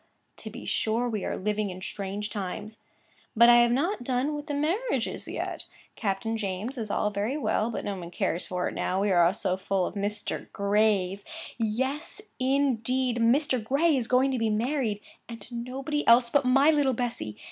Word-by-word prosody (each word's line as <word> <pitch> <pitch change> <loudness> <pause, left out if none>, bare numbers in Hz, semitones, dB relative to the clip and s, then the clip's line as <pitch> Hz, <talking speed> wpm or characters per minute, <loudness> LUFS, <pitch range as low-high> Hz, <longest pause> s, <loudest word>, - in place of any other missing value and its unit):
to - - -8
be - - -9
sure, 230 +3 0
we 215 -4 -2
are - - -2
living 210 +1 -1
in 185 0 -7
strange 200 +2 -5
times! 210 +2 -5 0.6
'But 235 +2 +7
I 240 - +8
have 240 0 +4
not 290 - 0
done 255 +4 0
with 295 +1 -5
the 290 - -2
marriages 360 +12 -1
yet. - - -4 0.3
Captain 225 +2 -2
James's 215 +4 -3
is - - -11
all 210 +1 0
very 210 +7 -1
well, 230 -6 0
but 230 - -4
no 205 - -2
one 175 -2 -7
cares 170 0 -2
for 180 -1 -1
it - - -4
now, 185 - -1
we 200 0 +1
are 175 -1 +5
so 185 -2 -1
full 190 -1 0
of - - -4
Mr. 205 +1 -3
Gray's. 200 -1 +1 0.4
Yes, 260 - -1 0.2
indeed, 255 -2 +1
Mr. 250 +1 +2
Gray 285 +7 +2
is 245 -4 -1
going 255 +2 +3
to 255 - -1
be 225 -1 +1
married, 225 -1 0 0.3
and 230 -1 -7
to 235 - -10
nobody 265 +5 -3
else 235 0 +6
but 285 -2 +3
my 270 +4 +5
little 290 -4 +2
Bessy! 230 - -3
230 Hz, 190 wpm, -27 LUFS, 205-265 Hz, 0.6 s, I